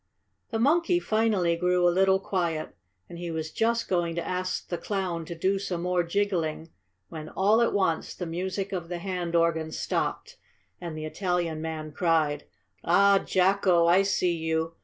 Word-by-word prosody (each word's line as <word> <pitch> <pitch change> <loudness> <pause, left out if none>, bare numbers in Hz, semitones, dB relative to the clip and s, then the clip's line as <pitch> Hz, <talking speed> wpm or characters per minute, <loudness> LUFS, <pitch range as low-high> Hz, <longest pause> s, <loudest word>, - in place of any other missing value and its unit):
The 225 - -2
monkey 335 +8 +3
finally 215 - +1
grew 180 +1 +2
a 175 - +3
little 190 +1 +3
quiet, 170 -5 -2 0.3
and 170 - -10
he 175 -1 -4
was 160 -1 -4
just 230 +1 0
going 175 -2 0
to 170 - -3
ask 185 0 -3
the 175 - -3
Clown 185 -5 -3
to 170 - -6
do 190 +4 0
some 175 -3 -3
more 180 0 +1
jiggling 170 -3 -1 0.4
when, 155 -1 -7
all 210 +4 +3
at 235 - +3
once, 185 -5 0
the 180 - -5
music 185 +4 -3
of 175 -3 -4
the 175 - -3
hand 175 -2 -3
organ 165 -1 +1
stopped, - - -3 0.4
and 170 -3 -6
the 155 - -5
Italian 175 -2 -2
man 160 -1 -5
cried: 155 -2 +1 0.4
"Ah, 200 +3 +5
Jacko! 185 -2 +3
I 175 +3 +5
see 185 -3 +1
you! 160 0 -1
175 Hz, 170 wpm, -27 LUFS, 165-195 Hz, 0.4 s, Ah